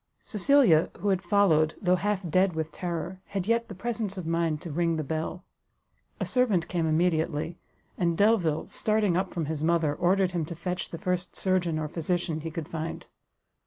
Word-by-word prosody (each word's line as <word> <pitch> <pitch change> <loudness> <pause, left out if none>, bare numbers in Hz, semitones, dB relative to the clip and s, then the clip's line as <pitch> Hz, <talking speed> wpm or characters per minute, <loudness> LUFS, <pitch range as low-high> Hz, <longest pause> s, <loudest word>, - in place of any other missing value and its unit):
Cecilia, 210 - +4
who 205 - -1
had 190 -2 +2
followed, 165 -7 +3
though 180 -1 +3
half 200 -1 -1
dead 185 +1 +2
with 160 0 -2
terror, 175 +2 -4
had 195 -3 -3
yet 230 +2 +1
the 200 - -8
presence 215 -1 -3
of 180 - -5
mind 165 -2 0
to 170 - -6
ring 165 +2 +1
the 155 - -2
bell. 160 +4 -3 0.8
A - - -1
servant 230 -10 +2
came 170 -2 0
immediately; 160 0 0 0.4
and 170 -2 +1
Delvile, 200 -8 +3
starting 215 -4 +1
up 185 - 0
from 170 -4 -2
his 155 0 -3
mother, 165 -2 +2
ordered 185 +3 +2
him 175 -2 -1
to 170 - -7
fetch 180 +2 -4
the 165 - -6
first 180 -1 -2
surgeon 180 -4 +1
or 155 -1 -2
physician 165 0 -2
he 165 - -4
could 160 -2 -5
find. 165 -1 -5
175 Hz, 185 wpm, -27 LUFS, 160-190 Hz, 0.8 s, Cecilia